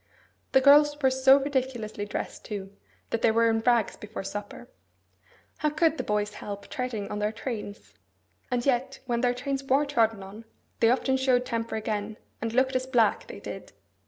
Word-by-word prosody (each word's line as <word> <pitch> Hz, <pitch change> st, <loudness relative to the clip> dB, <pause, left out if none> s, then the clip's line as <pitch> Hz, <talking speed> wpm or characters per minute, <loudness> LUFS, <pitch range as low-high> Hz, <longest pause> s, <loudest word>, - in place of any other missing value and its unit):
The 265 Hz, -, +6 dB
girls 290 Hz, +2 st, +6 dB
were 265 Hz, -2 st, +3 dB
so 265 Hz, +1 st, +6 dB
ridiculously 260 Hz, -7 st, -2 dB
dressed, -, -, -5 dB
too, 200 Hz, -2 st, -6 dB, 0.4 s
that 230 Hz, -, -1 dB
they -, -, +4 dB
were 230 Hz, +1 st, +3 dB
in 225 Hz, -, +1 dB
rags 235 Hz, -1 st, +2 dB
before 210 Hz, -1 st, -7 dB
supper. 205 Hz, +4 st, -7 dB, 0.9 s
How 300 Hz, -, +1 dB
could 315 Hz, +1 st, +2 dB
the -, -, -1 dB
boys 210 Hz, 0 st, -1 dB
help 200 Hz, -1 st, -7 dB
treading 240 Hz, -6 st, -3 dB
on 210 Hz, -, -3 dB
their 210 Hz, 0 st, 0 dB
trains? 210 Hz, -, -6 dB, 0.6 s
And 245 Hz, -1 st, -1 dB
yet 265 Hz, 0 st, 0 dB
when 240 Hz, -2 st, -1 dB
their 245 Hz, -1 st, +2 dB
trains 275 Hz, +2 st, -3 dB
were 270 Hz, +2 st, +2 dB
trodden 225 Hz, -7 st, +1 dB
on, 205 Hz, +4 st, -11 dB, 0.3 s
they 225 Hz, -, +5 dB
often 265 Hz, +2 st, +2 dB
showed 255 Hz, -1 st, +2 dB
temper 230 Hz, -2 st, -3 dB
again, 215 Hz, 0 st, -3 dB, 0.2 s
and 225 Hz, 0 st, -2 dB
looked 260 Hz, +2 st, +2 dB
as 255 Hz, 0 st, 0 dB
black, 235 Hz, -5 st, +2 dB
they -, -, -9 dB
did! -, -, -8 dB
240 Hz, 180 wpm, -27 LUFS, 215-265 Hz, 0.9 s, The